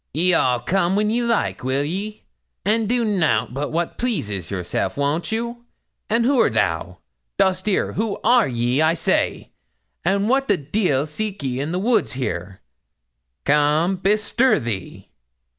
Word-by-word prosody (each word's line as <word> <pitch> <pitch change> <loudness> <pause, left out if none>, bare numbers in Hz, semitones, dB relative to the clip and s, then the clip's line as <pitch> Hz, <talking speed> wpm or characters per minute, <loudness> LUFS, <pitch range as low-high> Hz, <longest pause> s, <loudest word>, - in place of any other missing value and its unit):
'Ye'll 180 +3 +3
all 125 -1 +1
come 190 0 +1
when 210 +1 +1
ye 240 +2 +1
like, 235 - 0
will 130 +2 0
ye? 200 +8 -4 0.4
and 215 +1 +1
do 240 -1 +2
nout 160 - +1
but 140 +2 -3
what 170 +1 -2
pleases 105 - -2
yourselves, 90 +4 -2
won't 145 +7 -1
you? 235 +1 -3 0.5
And 230 +2 +2
who'rt 255 - +3
thou? 85 -3 -1 0.4
Dost 185 +1 +1
'eer 200 - +1
who 215 -1 -1
are 240 0 +5
ye, 120 +2 0
I 160 +1 +3
say; - - -1 0.5
and 195 +3 +1
what 270 +3 +2
the 205 - +3
deil 150 -2 0
seek 195 +3 -4
ye 130 -1 -2
in 145 +4 -2
the 180 - -1
woods 220 - +1
here? 95 -7 -4 0.8
Come, 150 +5 +3
bestir 215 +6 +2
thee!' 110 -7 -6
180 Hz, 155 wpm, -21 LUFS, 135-215 Hz, 0.8 s, are